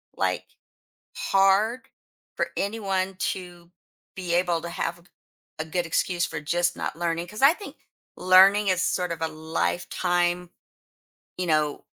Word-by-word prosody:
like, - - -1 0.7
hard 195 +6 +3 0.5
for - - 0
anyone 195 -2 -1 0.2
to 175 -2 -11 0.5
be 180 -2 -3
able 175 -2 +1
to 170 - -6
have 170 - -3
a - - -20
go - - -24 0.5
a 155 - -2
good 175 +2 -2
excuse 175 +1 0
for 160 -2 -5
just 175 +3 0
not - - -4
learning. 170 0 -2
'Cause 210 +6 -8
I 290 +4 +8
think 405 - -10 0.4
learning 190 +3 +6
is 185 -1 +2
sort 180 -1 0
of 165 - -5
a 160 - +1
lifetime, 165 - -1 0.9
you 180 - -2
know 155 -2 0
175 Hz, 145 wpm, -25 LUFS, 170-190 Hz, 0.9 s, I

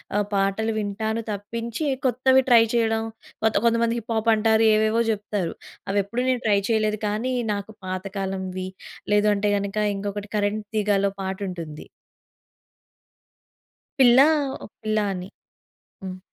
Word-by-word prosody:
ఆహ్, 205 0 +2
పాటలు 200 +3 +1
వింటాను 220 +2 -2
తప్పించి 230 +7 -4 0.2
కొత్తవి 260 +1 +4
ట్రై 235 -2 +8
చేయడం. 225 -1 +1 0.4
కొత్త 220 - +2
కొంతమంది 230 0 +2
హిప్ 230 +1 -5
హాప్ 220 +1 +1
అంటారు 220 +1 +3
ఏవేవో 220 +2 +2
జెప్తారు. 205 -4 -3 0.4
అవి 200 - +2
ఎప్పుడూ 235 +5 -3
నేను 250 -2 +1
ట్రై 205 -2 +4
చేయలేదు 215 -1 +1
కానీ, 220 +5 -1 0.2
నాకు 200 +1 -5
పాతకాలంవి, 190 0 -4 0.5
లేదంటే 210 0 +3
గనుక 200 0 -4 0.2
ఇంకొకటి 205 +1 -4
కరెంట్ 210 +1 -1
తీగాలో 205 -2 +2
పాటుంటుంది. 185 -5 -5 2.1
'పిల్ల 250 -1 +7 0.4
ఓ - - -6 0.2
పిల్ల' 215 -1 0
అని. 185 0 -6 0.7
హ్మ్. 185 -1 -6
210 Hz, 120 wpm, -24 LUFS, 195-225 Hz, 2.1 s, ట్రై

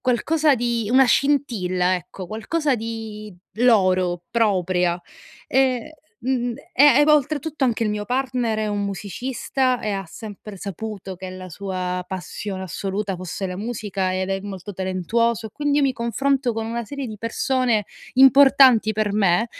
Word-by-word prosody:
qualcosa 290 +4 +2
di 235 -2 -1
una 265 +1 +6
scintilla, 220 -10 +1
ecco, 180 +1 -7
qualcosa 275 - -1
di 220 -2 -6 0.3
loro, 185 -7 +3
propria. 185 -5 +1 0.5
E, 265 +3 +1 0.2
mhmm, 245 -1 -1 0.2
e 280 - +5
e 295 - +6
vo 300 0 +6
oltretutto 300 +1 -1
anche 235 -3 +2
il 210 - 0
mio 210 0 -3
partner 250 -3 -1
è 215 - -1
un 205 -1 -1
musicista 250 +6 -2
e 215 - -2
ha 195 -1 -3
sempre 210 +2 -9
saputo 195 0 -6
che 185 +1 -8
la 185 0 -8
sua 180 0 -4
passione 190 +1 -5
assoluta 195 +3 -3
fosse 185 +2 -5
la 180 0 -5
musica, 205 -4 -3
ed 190 +1 -2
è 195 0 -1
molto 200 0 -7
talentuoso, 215 +5 -1
e - - -10
quindi 290 -1 0
io 285 - +3
mi 270 - +2
confronto 250 +2 0
con 225 0 -3
una 235 +1 -3
serie 280 +3 -5
di 215 - -7
persone 235 -1 0 0.3
importanti 265 -3 +6
per 215 -1 -1
me, 200 +1 +2
220 Hz, 155 wpm, -22 LUFS, 190-255 Hz, 0.5 s, una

